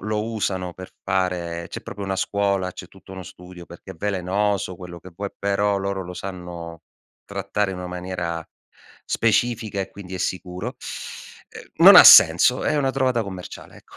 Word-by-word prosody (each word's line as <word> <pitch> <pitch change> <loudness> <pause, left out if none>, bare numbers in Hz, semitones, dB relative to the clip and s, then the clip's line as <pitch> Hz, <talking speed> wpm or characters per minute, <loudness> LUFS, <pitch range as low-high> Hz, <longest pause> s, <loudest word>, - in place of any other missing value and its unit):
lo 105 +1 -2
usano 95 -4 -2
per 95 0 -10
fare 90 -3 -2
c'è - - -8
proprio 100 - -7
una 95 - -2
scuola, 100 -2 -1
c'è 90 - -10
tutto 95 0 -15
uno 95 -1 -8
studio 90 0 -12
perché 85 +2 -13
è - - -16
velenoso, 100 +1 -1
quello 85 -1 -10
che 95 - -13
vuoi, 100 +3 -5
però 100 0 0
loro 100 0 -3
lo 90 0 -9
sanno 90 -3 -8 0.4
trattare 100 0 -2
in - - -7
una 90 - -6
maniera 90 -2 -5 0.6
specifica 110 -2 0
e, 95 - -5
quindi, 95 -2 -10
è 95 - -5
sicuro. 90 +8 -4 1.0
Uhm, - - +4
non - - +11
ha - - +11
senso, 85 +11 +8
è 150 - +1
una 135 -2 +1
trovata 130 -3 0
commerciale, 95 -3 -9
ecco. - - -19
95 Hz, 170 wpm, -22 LUFS, 90-100 Hz, 1.0 s, non